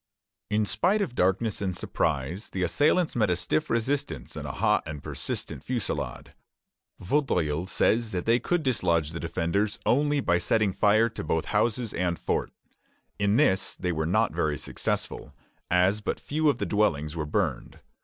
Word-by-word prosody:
In 105 0 +1
spite 200 - +2
of 160 - -5
darkness 100 +2 +1
and 95 -3 -2
surprise, 80 +7 -2
the 95 - -2
assailants 155 - +2
met 110 -5 +2
a 90 - +2
stiff 85 -3 -1
resistance 130 +5 -2
and - - -5
a - - -4
hot - - +2
and 75 -2 -6
persistent - - -4
fusillade. 75 - -3 0.7
Vaudreuil 90 - 0
says 115 +3 +1
that 90 -4 -3
they 115 +2 +4
could 175 +3 0
dislodge 85 - +1
the 85 - -5
defenders 90 +5 -1
only 145 +2 +2
by 90 -9 +2
setting 100 +3 +1
fire 110 +4 +4
to 115 - -6
both 80 +1 0
houses 115 -1 +1
and 85 -1 -1
fort. - - -1 0.7
In 100 0 +2
this 95 -3 +3
they 90 -1 -2
were 80 -1 -1
not 110 +2 +2
very 80 -3 0
successful, - - -4 0.3
as 90 +4 +3
but - - -2
few 155 +1 +1
of 140 - +1
the - - -2
dwellings 80 -8 0
were 75 -2 -3
burned. - - -2
100 Hz, 165 wpm, -27 LUFS, 85-115 Hz, 0.7 s, they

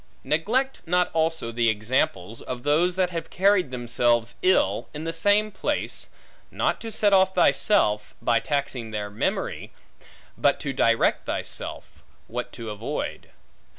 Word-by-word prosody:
Neglect 235 - 0
not 180 +1 +2
also 160 -7 0
the 115 0 +2
examples, 105 -2 -1
of 125 -1 -6
those 165 +5 +2
that 185 -1 +1
have 165 -1 -5
carried 190 -4 +3
themselves 120 -1 0
ill, 185 +1 +2
in 150 - -5
the 165 0 -3
same 205 +5 +2
place; 190 - -2 0.4
not - - -1
to 225 - -6
set 205 -1 +2
off 190 0 +4
thyself, 105 - +2
by 115 -1 +2
taxing 135 -4 -2
their 105 -1 -4
memory, 105 - -2 0.6
but - - +2
to 140 - -3
direct 115 -3 +2
thyself, - - -6 0.2
what - - -5
to 115 -2 -6
avoid. 105 - -5
150 Hz, 140 wpm, -25 LUFS, 115-185 Hz, 0.6 s, off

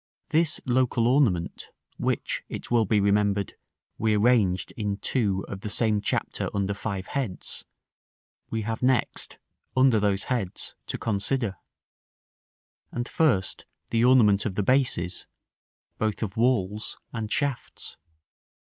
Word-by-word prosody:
This 160 -1 +2
local 125 -2 +2
ornament, 120 - +2 0.3
which, - - -1
it - - -6
will 115 -2 +4
be 105 +1 +3
remembered, 100 0 +2 0.5
we 110 -1 +2
arranged 105 -5 +3
in 105 -3 -2
§ - - -4
II. 100 -6 +2
of 95 -1 -6
the 105 - -4
same 105 -1 +1
chapter - - -1
under 100 0 0
five 100 -2 -4
heads, 130 -10 -4 0.8
we 110 -1 -2
have 110 +1 -3
next, 125 -2 0 0.4
under 130 -4 +5
those 100 -1 +1
heads, 115 -8 -2
to - - -3
consider. 110 0 -1 1.4
And, 120 0 -3
first, 120 -13 +1 0.2
the 115 0 +3
ornament 110 -5 +5
of 95 - -4
the 105 - +1
bases, 110 -8 +1 0.7
both 110 0 0
of 100 -2 -4
walls 110 -4 0 0.2
and 110 -2 -4
shafts. 140 -4 -3
110 Hz, 130 wpm, -26 LUFS, 100-125 Hz, 1.4 s, under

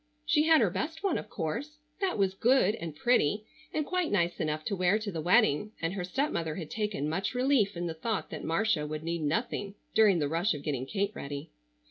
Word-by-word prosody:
She 300 +1 +3
had 320 -1 +6
her - - +3
best 320 +3 -3
one 390 -4 +1
of - - -9
course. 235 - -4 0.2
That 385 - 0
was 195 -2 +2
good, 225 0 +3
and 165 -8 -6
pretty, 210 0 +2 0.3
and 305 - -1
quite 365 -1 -1
nice 175 -3 +1
enough 155 0 -2
to 200 - -1
wear 185 +2 +3
to 215 -2 -4
the 165 -3 -3
wedding, 210 +1 +3
and 165 +2 -1
her 195 -2 -3
stepmother 180 - -1
had 160 -4 -6
taken 210 -9 -2
much 190 +9 -2
relief 250 -7 +2
in 175 - -2
the 165 - -2
thought 210 +6 -3
that - - -6
Marcia 165 -3 +1
would 155 +1 -5
need 170 0 -2
nothing 200 +5 -1 0.2
during 210 -4 +5
the 150 -3 +1
rush 165 +5 +1
of 145 - -7
getting 135 -4 -2
Kate 200 +2 -1
ready. 140 - -6
195 Hz, 215 wpm, -30 LUFS, 160-235 Hz, 0.3 s, had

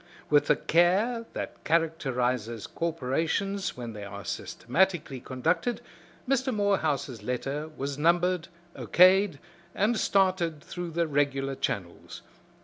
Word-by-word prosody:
With 145 -1 +5
the - - +5
care 205 +8 +2
that - - -6
characterizes 125 -9 0
corporations 165 +6 -2
when 120 -2 -6
they 105 -1 -7
are 100 0 -8
systematically 150 0 -1
conducted, 130 - -1 0.5
Mr. 265 0 +1
Morehouse's 160 - 0
letter 135 +6 -3
was 140 +1 -4
numbered, 175 +2 +2 0.3
O.K'd, 185 -2 +5 0.4
and 215 +2 +2
started 185 -6 +1
through 175 0 -6
the 170 +1 0
regular 140 -2 0
channels. 100 -10 -4
160 Hz, 110 wpm, -28 LUFS, 130-185 Hz, 0.5 s, With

